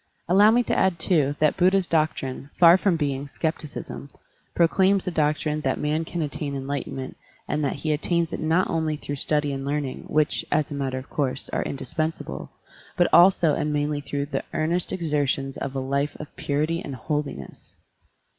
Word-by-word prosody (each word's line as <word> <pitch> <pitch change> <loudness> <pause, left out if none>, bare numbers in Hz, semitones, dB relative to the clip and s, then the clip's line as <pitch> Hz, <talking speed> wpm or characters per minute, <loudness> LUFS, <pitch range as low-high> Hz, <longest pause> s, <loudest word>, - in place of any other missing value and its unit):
Allow 200 +5 +6
me 240 +2 +4
to - - -1
add, 190 -2 +2
too, 150 -4 +1
that 155 -1 +2
Buddha's 185 +1 +4
doctrine, 150 -5 -1
far 170 -1 +8
from 190 -1 +2
being 140 -2 -2
skepticism, 150 -2 -4 0.5
proclaims 190 +3 +3
the 180 - -1
doctrine 155 -1 0
that - - 0
man 155 +2 -1
can 170 0 -3
attain 145 -1 -4
enlightenment 135 -1 -4 0.3
and 150 - -1
that 140 - 0
he 155 +2 -1
attains 170 +2 0
it - - -3
not 160 +4 +2
only 160 -2 -1
through 145 -1 -5
study 150 0 0
and 135 0 -4
learning, 140 -1 -3
which, 155 0 +1
as 150 -1 +1
a - - -3
matter 135 -2 -2
of 130 - -7
course, 135 -2 -1
are - - -1
indispensable, 155 +3 -4 0.5
but 175 - +4
also 175 -3 +6
and 150 - -1
mainly 145 0 -1
through 140 -1 -3
the 145 - -3
earnest 170 +3 0
exertions 145 -5 -1
of 135 0 -5
a - - 0
life 140 +2 -1
of 150 - -9
purity 155 +4 -1
and 140 - -6
holiness. 145 - -5
150 Hz, 175 wpm, -25 LUFS, 140-165 Hz, 0.5 s, far